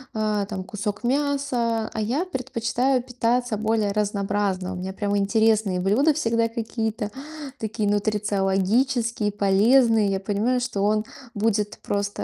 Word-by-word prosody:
а, 215 -2 0
там 195 -3 -4
кусок 210 +2 -4
мяса. 255 -4 0
А 220 - -2
я 265 - 0
предпочитаю 255 -3 0
питаться 245 -1 0
более 215 -1 +1
разнообразно. 200 -2 -1
У - - -5
меня 190 +1 -5
прямо 205 0 -1
интересные 215 -2 +2
блюда 230 +12 +3
всегда 230 -5 +1
какие-то 225 -2 -3 0.5
такие 215 -1 -2
нутрициологические, 210 +3 +1
полезные. 210 +2 +4
Я 195 - 0
понимаю, 210 +6 0
что 245 -5 -2
он 210 +1 +2 0.3
будет 210 -1 0
просто, 205 0 -2
215 Hz, 130 wpm, -24 LUFS, 205-235 Hz, 0.5 s, полезные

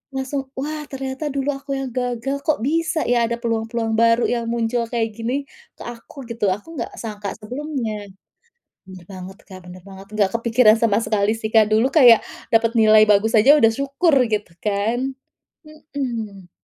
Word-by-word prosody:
langsung, 265 0 -4
wah 300 +2 -4
ternyata 270 +2 -5
dulu 280 +1 -2
aku 275 0 -9
yang 270 - -4
gagal, 250 +2 -2
kok 310 - +1
bisa 320 +2 0
ya 240 -1 +2
ada 235 +1 -2
peluang-peluang 225 -1 -2
baru 230 +1 +3
yang 235 -1 -1
muncul 235 0 -1
kayak 230 -2 0
gini 230 +3 -3 0.4
ke - - -10
aku 240 +3 -10
gitu, 230 -2 -2
aku 265 - -10
enggak 235 - -4
sangka 210 -3 -5
sebelumnya. 250 0 -4 0.9
Bener 185 -2 -12
banget, 185 +1 -9
Kak, 185 -1 -10
bener 180 +1 -11
banget, 195 0 -12
enggak 205 -3 +1
kepikiran 230 -1 +4
sama 215 -2 +3
sekali 210 0 +1
sih, 220 -1 -4
Kak. 220 -1 +6
Dulu 225 +4 +3
kayak 245 -7 +7 0.3
dapat 230 0 +3
nilai 215 -1 +6
bagus 210 +2 +3
aja 270 +8 +7
udah 225 -3 +5
syukur 275 +6 0
gitu, 210 -4 -3
kan. 225 +6 -1 0.5
Mhm. 235 - -6
230 Hz, 165 wpm, -21 LUFS, 215-270 Hz, 0.9 s, kayak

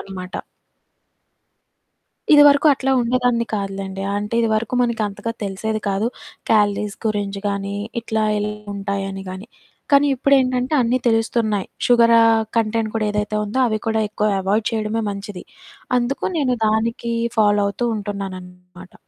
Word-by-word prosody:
అన్నమాట. 185 -1 -8 2.0
ఇదివరకు 290 0 +7
అట్లా 270 0 -2
ఉండేదాన్ని 240 -1 +1
కాదులెండి. 195 -1 -4
అంటే 210 +2 -3
ఇది 230 - +1
వరకు 230 +3 -1
మనకంతగా 220 -2 -2
తెలిసేది 215 +3 -3
కాదు. 200 +3 0 0.4
క్యాలరీస్ 210 -1 +2
గురించి 205 -2 -2
గాని, 200 0 -3 0.3
ఇట్లా 220 -1 -2 0.2
ఎల్ 210 0 -1 0.3
ఉంటాయని 195 -1 -4
గాని. 185 +3 -8 0.5
కానీ 280 +1 +6
ఇప్పుడేంటంటే 260 0 +2
అన్నీ 245 +2 +1
తెలుస్తున్నాయి. 225 -3 0 0.2
షుగరా 235 -1 +5 0.4
కంటెంట్ 225 0 0
కూడా 220 -1 0
ఏదైతే 210 +1 -2
ఉందో, 210 +5 -3
అవి 215 -2 0
కూడా 220 0 +1
ఎక్కువ 210 0 -1
అవాయిడ్ 205 +3 0
చేయడమే 220 0 -1
మంచిది. 200 -1 -7 0.5
అందుకు 245 +3 -2
నేను 270 -5 +1
దానికి 230 +2 0 0.3
ఫాలో 205 -1 +4
అవుతూ 240 +4 -2
ఉంటున్నాననమాట. 185 -3 -8
215 Hz, 125 wpm, -20 LUFS, 200-235 Hz, 2.0 s, ఇదివరకు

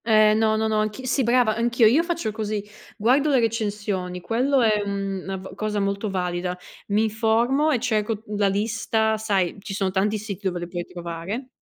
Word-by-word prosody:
Ehm, 215 -1 +5
no, 220 -1 +3
no, 220 0 +1
no, 215 -1 0
anch'i 215 +4 -2
sì 255 +2 +1
brava, 240 -2 +3
anch'io, 235 0 +2
io 250 +9 +5
faccio 335 -9 -2
così: 215 -1 -3 0.3
guardo 260 +8 +3
le 270 -3 +4
recensioni, 205 -5 -2
quello 255 +8 +1
è, 215 -2 +3
uhm, 195 -1 -3
na 195 0 -3
v 190 0 -9
cosa 210 +1 -2
molto 200 +1 -1
valida. 180 -1 -2 0.3
Mi 210 +2 +2
informo 230 +7 +2
e 270 -6 +2
cerco, 220 -2 -1
uhm, 210 - -5
la 205 -1 +3
lista. 220 +2 0
Sai, 200 -5 0
ci 195 -1 -6
sono 195 -1 0
tanti 205 +3 +1
siti 205 -2 -5
dove 180 -1 -2
li 175 - -5
puoi 175 0 -5
trovare... 175 +8 -6
215 Hz, 195 wpm, -24 LUFS, 195-230 Hz, 0.3 s, Ehm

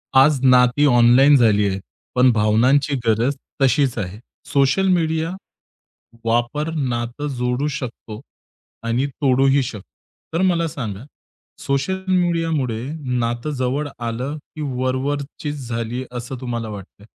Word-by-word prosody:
आज 135 +1 +6
नाती 125 +2 +5
ऑनलाईन 125 +2 +6
झालीयेत, 105 -6 +3 0.4
पण 125 0 +5
भावनांची 120 +7 +3
गरज 115 +5 +2 0.3
तशीच 135 -1 +2
आहे. 100 0 -4 0.3
सोशल 140 +8 +2
मीडिया 165 -2 +1 0.9
वापर 120 +7 0
नातं 125 0 -2
जोडू 125 +3 0
शकतो 115 -3 -7 0.7
आणि 120 +4 +1
तोडूही 135 0 +2
शकतो. 110 -6 -7 0.5
तर 165 - +1
मला 175 -3 +2
सांगा, 115 -7 -6 0.6
सोशल 140 +8 -1
मीडियामुळे 165 -10 0 0.4
नातं 120 +4 -2
जवळ 130 +4 -1
आलं, 120 +5 -3 0.2
की 155 - -6
वरवरचीच 140 +1 -3
झाली, 115 +2 -3
असं 125 +1 -6
तुम्हाला 120 -3 -4
वाटतंय? 100 0 -10
130 Hz, 110 wpm, -21 LUFS, 120-145 Hz, 0.9 s, आज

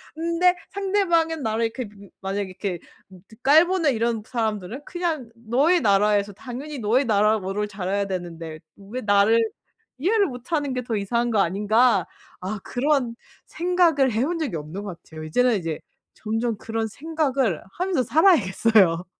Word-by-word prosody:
근데 335 +2 +2 0.2
상대방은 345 -6 +1
나를 225 +1 0
이렇게 230 0 -4
그 200 -1 -15
만약에 195 0 -3
이렇게 185 -2 -4 0.5
그 220 - -15
깔보는 320 +1 +4
이런 225 -1 -1
사람들은 220 0 -3
그냥 330 -9 -3
'너의 265 +10 +2
나라에서 205 -1 +2
당연히 265 +6 -7
너의 240 +6 +2
나라어를 210 -1 +1
잘해야 200 0 -2
되는데 165 -4 -6 0.2
왜 210 +6 -7
나를 205 +2 +4 0.6
이해를 400 +9 +2
못 250 +4 -9
하는 290 -4 0
게 250 - -3
더 230 -2 -2
이상한 235 +4 0
거 215 - +2
아닌가.' 205 +3 +3 0.4
아 195 +3 -4
그런 255 -2 0 0.3
생각을 340 -6 +2
해본 275 +10 0
적이 265 - -2
없는 155 +7 -7
것 185 -5 -8
같아요. 155 -1 -10
이제는 240 +9 +2
이제 165 -3 -4 0.3
점점 225 0 -2
그런 225 0 -3
생각을 270 - -1 0.2
하면서 360 -7 0
살아야겠어요. 215 - +4
230 Hz, 330 characters per minute, -24 LUFS, 200-290 Hz, 0.6 s, 깔보는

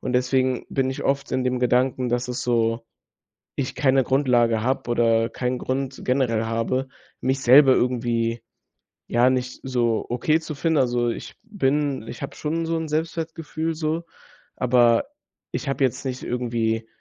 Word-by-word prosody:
Und 130 - -3
deswegen 130 0 +1
bin 130 -1 0
ich 130 - -5
oft 140 0 0
in 130 - 0
dem 125 0 0
Gedanken, 125 0 +1
dass 120 +1 -1
es 125 - -3
so 115 -1 0 0.7
ich 135 -3 -3
keine 135 -2 +3
Grundlage 120 -4 +2
habe 130 -1 -1
oder 115 -1 +3
keinen 125 +2 -2
Grund 130 0 -3
generell 125 -4 +1
habe, 115 +4 -1 0.3
mich 130 +1 -1
selber 130 +2 +7
irgendwie, 120 -2 0 0.7
ja, 120 +2 +4
nicht 125 -1 -2
so 120 -4 0
okay 155 +6 +1
zu 155 -2 -7
finden. 160 +1 +1
Also, 120 -2 +1
ich - - -6
bin 145 - -1
ich 115 - -8
habe 140 - -6
schon 165 +2 -2
so 165 0 -1
'n 160 -1 -3
Selbstwertgefühl 160 0 -3
so, 160 +1 -2 0.5
aber 120 -2 +3 0.5
ich 140 - -3
habe 135 0 0
jetzt 130 - 0
nicht 130 -1 -4
irgendwie 115 -2 -1
130 Hz, 160 wpm, -23 LUFS, 120-140 Hz, 0.7 s, selber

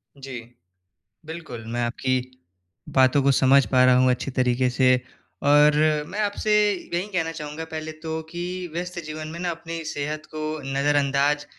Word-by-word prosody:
जी। 135 -3 -7 0.9
बिल्कुल, 160 -9 -8
मैं 120 +2 -3
आपकी 130 +2 0 0.7
बातों 130 +1 +4
को 140 - +4
समझ 135 +1 +5
पा 130 -1 +4
रहा 125 0 +6
हूँ 130 0 +4
अच्छी 125 +2 -1
तरीके 125 0 +1
से 130 0 +4 0.5
और 150 +1 +6 0.3
मैं 205 +5 -4
आपसे 210 +1 0 0.2
यही 180 0 -4
कहना 165 -3 -1
चाहूँगा 150 0 -6
पहले 155 0 -5
तो 160 0 -3
कि 175 +1 -5 0.3
व्यस्त 175 +1 -4
जीवन 155 0 -6
में 165 - -7
ना, 180 - -1
अपनी 165 0 -6
सेहत 155 +1 -4
को 155 0 -3
नज़रअंदाज़ 145 +1 +2
150 Hz, 155 wpm, -24 LUFS, 130-160 Hz, 0.9 s, रहा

